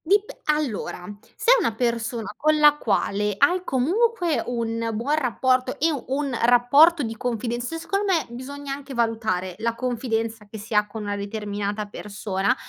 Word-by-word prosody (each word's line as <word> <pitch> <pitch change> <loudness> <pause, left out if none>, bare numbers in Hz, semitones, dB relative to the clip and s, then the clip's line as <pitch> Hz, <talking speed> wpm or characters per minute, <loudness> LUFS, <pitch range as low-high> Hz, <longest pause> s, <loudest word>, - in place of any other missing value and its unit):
Dip 405 +4 +1
allora, 290 -12 -1 0.3
se - - +3
è - - +7
una 230 - 0
persona 235 -2 -2
con 310 0 +2
la 295 -1 +7
quale 210 -4 0
hai 355 - +3
comunque 350 - +1
un 230 -1 -2
buon 245 +8 0
rapporto 255 -1 +1
e 325 +2 +3 0.2
un 275 -1 -1
rapporto 280 +7 +5
di 225 -1 -4
confidenza 240 +5 -3
secondo 395 +5 -2
me 330 -6 +2
bisogna 275 +3 -6
anche 275 -1 -8
valutare 220 -6 -1
la 230 +1 -1
confidenza 225 -3 -2
che 220 - -8
si 220 +2 -8
ha 210 0 +3
con 215 +1 -7
una 205 0 -2
determinata 205 0 -3
persona; 200 -1 -2
240 Hz, 155 wpm, -24 LUFS, 220-285 Hz, 0.3 s, è